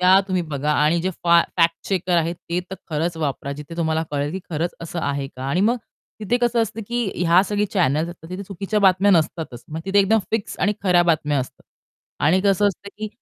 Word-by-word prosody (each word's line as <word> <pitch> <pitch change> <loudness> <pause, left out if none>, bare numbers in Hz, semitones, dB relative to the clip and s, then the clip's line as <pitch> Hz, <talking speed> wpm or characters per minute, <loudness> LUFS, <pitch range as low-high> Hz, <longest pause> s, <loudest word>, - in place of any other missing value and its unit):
त्या 185 +1 +6
तुम्ही 185 -2 0
बघा 150 -2 -2
आणि 150 +3 +2
जे 185 - 0
फॅ 170 0 +6
फॅक्ट-चेकर 175 +1 +1
आहेत, 170 0 +1 0.2
ते 175 +1 +1
तर - - -3 0.2
खरंच 165 +2 -1
वापरा. 140 -3 -3
जिथे 150 +3 -9
तुम्हाला 160 -1 0
कळेल 145 0 -1
की 190 - -3
खरंच 165 +2 -2
असं 170 +1 -5
आहे 140 -1 -1
का? 130 -1 -10
आणि 170 +6 +1
मग 230 +5 +3 0.4
तिथे 220 +3 +1
कसं 240 -1 +2
असतं 225 0 -4
की 240 -4 -1 0.2
ह्या 175 +3 +6
सगळ्या 205 -1 0
चॅनल्स 160 -4 +1
असतात. 170 -2 -11
तिथे 185 +2 -5
चुकीच्या 200 +2 -2
बातम्या 190 +1 +4
नसतातच. 155 -7 0
मग 155 +1 -5
तिथे 195 +1 +2
एकदम 200 +3 +4
फिक्स 220 -2 -2
आणि 205 - +2
खऱ्या 180 -3 +4
बातम्या 155 -4 +1
असतात. 130 - -6 0.6
आणि 180 +5 +4
कसं 200 0 +3
असतं 200 +1 -7
की, 215 0 -3
175 Hz, 210 wpm, -22 LUFS, 155-195 Hz, 0.6 s, त्या